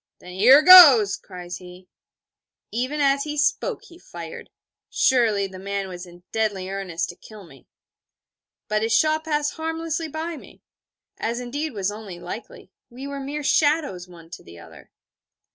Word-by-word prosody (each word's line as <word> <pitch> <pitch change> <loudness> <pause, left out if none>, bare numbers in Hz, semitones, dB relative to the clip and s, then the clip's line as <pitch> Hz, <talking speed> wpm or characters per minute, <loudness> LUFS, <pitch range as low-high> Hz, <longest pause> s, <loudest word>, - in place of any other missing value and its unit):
'Then 180 - -13
here 255 +10 +6
goes!' 285 - +9
cries 180 -2 -9
he. 180 0 -14 0.8
Even 255 +6 -3
as 280 -1 +2
he 300 0 -6
spoke, 385 +8 -1
he 350 -6 -17
fired. 170 - -10 0.4
Surely, 225 -6 +2
the 190 -1 -10
man 200 0 -4
was 180 -1 -9
in 175 0 -16
deadly 205 -4 -2
earnest 185 -4 -4
to 175 - -9
kill 210 +2 -14
me. 135 -6 -19 1.0
But 215 0 -1
his 225 +1 +1
shot 310 0 +1
passed 295 -2 -1
harmlessly 325 0 -4
by 315 +2 -5
me: - - -16 0.6
as 235 +2 -3
indeed 285 +5 -5
was 200 -1 -2
only 205 -4 -9
likely: - - -10 0.2
we 255 +3 -10
were 280 0 -6
mere 285 +2 -5
shadows 290 - +1
one 165 -2 -16
to - - -10
the 85 +1 -14
other. 85 - -15
230 Hz, 160 wpm, -23 LUFS, 185-300 Hz, 1.0 s, goes